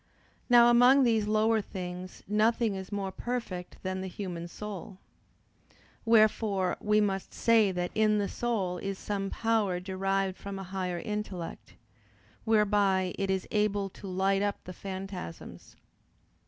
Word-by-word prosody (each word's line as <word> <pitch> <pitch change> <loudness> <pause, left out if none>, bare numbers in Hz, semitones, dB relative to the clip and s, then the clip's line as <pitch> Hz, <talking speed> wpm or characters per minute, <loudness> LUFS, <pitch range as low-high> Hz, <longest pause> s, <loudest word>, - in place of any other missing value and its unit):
Now 240 -1 +7
among 250 +3 +6
these 225 -4 +2
lower 215 +1 +3
things 180 -1 -7
nothing 220 +2 +2
is 190 0 -7
more 200 -2 -2
perfect 215 -7 -5
than 185 0 -2
the 190 - -4
human 175 -3 -5
soul. 200 0 -8 1.1
Wherefore 215 -4 +3
we 210 0 +3
must 195 -2 -1
say 225 -4 +4
that 180 -1 -2
in 215 -1 +3
the 205 -1 0
soul 195 -8 -2
is 195 -1 -4
some 195 -1 -3
power 220 -6 0
derived 190 0 -1
from 200 -1 -6
a 195 - -5
higher 185 -1 -3
intellect, 195 -2 -5 0.7
whereby 205 -4 +2
it 195 -1 -1
is 190 -1 -1
able 205 -2 +1
to 200 - -10
light 190 +1 +1
up 205 0 -2
the 185 - -8
phantasms. 190 - -8
195 Hz, 140 wpm, -29 LUFS, 185-215 Hz, 1.1 s, Now